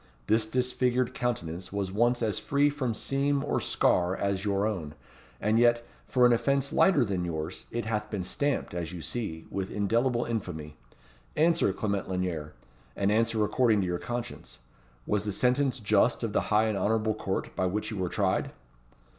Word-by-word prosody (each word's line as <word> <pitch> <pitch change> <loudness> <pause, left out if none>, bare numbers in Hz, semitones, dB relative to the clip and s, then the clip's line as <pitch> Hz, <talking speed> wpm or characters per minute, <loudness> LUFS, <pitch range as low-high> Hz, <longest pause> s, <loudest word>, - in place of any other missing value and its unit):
This 110 0 +2
disfigured 125 +1 0
countenance 95 -9 -3
was 100 -2 -2
once 120 +4 +2
as 110 -2 0
free 145 +1 +2
from 130 -6 -2
seam 140 +2 0
or - - 0
scar 90 +1 +2
as 100 -1 -1
your 100 -1 +1
own; 90 -9 -3 0.4
and 110 +2 +2
yet, 120 0 +4 0.2
for 125 -1 +4
an 120 - +6
offence 140 +3 +1
lighter 150 -10 +4
than 95 -4 -2
yours, 80 0 -4
it 120 -1 -3
hath 105 -1 -2
been 100 -4 -3
stamped, 140 +5 -1
as 85 -2 -4
you 85 -3 -7
see, 105 -10 -4
with 95 -1 -3
indelible 120 +4 +1
infamy. 85 -10 -4 0.6
Answer, 160 - +3
Clement 100 -1 -2
Lanyere, 90 -5 -3 0.4
and 100 0 +1
answer 110 0 +2
according 110 -2 +3
to - - 0
your 90 -1 -2
conscience, 120 0 -6 0.5
Was 105 -1 0
the 105 - -1
sentence 130 +5 +1
just 110 +2 +2
of 110 -3 -2
the - - +2
high 105 +1 +4
and 110 -3 0
honourable 110 0 +1
court 95 -3 -3
by 95 - +1
which 105 +5 -2
you 105 - -4
were 90 -2 -1
tried?" 95 -1 0
110 Hz, 175 wpm, -28 LUFS, 95-120 Hz, 0.6 s, an